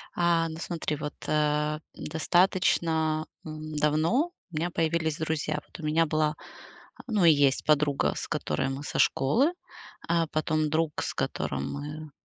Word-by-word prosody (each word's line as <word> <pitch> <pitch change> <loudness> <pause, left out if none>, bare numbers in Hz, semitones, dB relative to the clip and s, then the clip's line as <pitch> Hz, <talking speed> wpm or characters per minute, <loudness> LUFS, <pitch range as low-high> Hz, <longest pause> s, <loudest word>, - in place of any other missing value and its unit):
А, 170 -1 +2
ну, 160 - -7
смотри, 165 -3 -3
вот, 150 0 -5
э, 150 0 +1
достаточно, 160 -1 +1 0.2
м, 155 0 -7
давно 160 - +2 0.2
у - - -10
меня 170 +3 -1
появились 160 -2 0
друзья. 155 -1 -1
Вот - - -13
у - - -8
меня 160 +2 +3
была, 155 0 +1 0.7
ну 210 -6 +2
и 165 - +9
есть 140 -2 +3
подруга, 145 - +2
с - - -5
которой 135 - -1
мы 135 +2 -5
со - - -3
школы. 245 - +3 0.6
Э, 170 -1 +3
потом 155 0 0
друг, 160 0 0
с - - -3
которым 70 0 -2
мы 150 +1 -6
155 Hz, 150 wpm, -28 LUFS, 150-165 Hz, 0.7 s, и